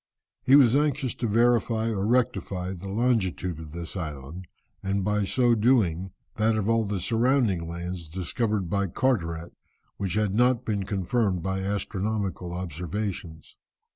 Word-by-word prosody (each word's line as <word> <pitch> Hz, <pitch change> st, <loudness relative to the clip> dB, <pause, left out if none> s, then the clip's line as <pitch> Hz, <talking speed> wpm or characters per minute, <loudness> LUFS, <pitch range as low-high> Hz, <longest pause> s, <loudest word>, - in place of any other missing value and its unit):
He 135 Hz, -, +5 dB
was 130 Hz, -4 st, +6 dB
anxious 145 Hz, -3 st, +1 dB
to 120 Hz, -, -2 dB
verify 115 Hz, 0 st, +2 dB
or 100 Hz, -1 st, -1 dB
rectify 100 Hz, -6 st, 0 dB
the 95 Hz, +1 st, -7 dB
longitude 95 Hz, -6 st, 0 dB
of 80 Hz, -2 st, -9 dB
this 85 Hz, +2 st, -7 dB
island, 80 Hz, +1 st, -6 dB, 0.3 s
and 95 Hz, 0 st, -1 dB
by 105 Hz, 0 st, +1 dB
so 120 Hz, +3 st, +3 dB
doing, 105 Hz, -6 st, +2 dB, 0.3 s
that 110 Hz, +1 st, +2 dB
of 105 Hz, -2 st, -1 dB
all 115 Hz, -1 st, +2 dB
the 100 Hz, -1 st, -2 dB
surrounding 115 Hz, -5 st, +1 dB
lands 85 Hz, -1 st, -5 dB
discovered 95 Hz, +3 st, -1 dB
by 100 Hz, +2 st, 0 dB
Carteret, 85 Hz, -7 st, -1 dB, 0.4 s
which 95 Hz, -2 st, -2 dB
had 105 Hz, -2 st, +1 dB
not 125 Hz, +2 st, +3 dB
been 100 Hz, -3 st, -1 dB
confirmed 95 Hz, -2 st, 0 dB
by 95 Hz, +1 st, -1 dB
astronomical 100 Hz, -2 st, -2 dB
observations. 90 Hz, 0 st, -5 dB
100 Hz, 140 wpm, -26 LUFS, 90-115 Hz, 0.4 s, was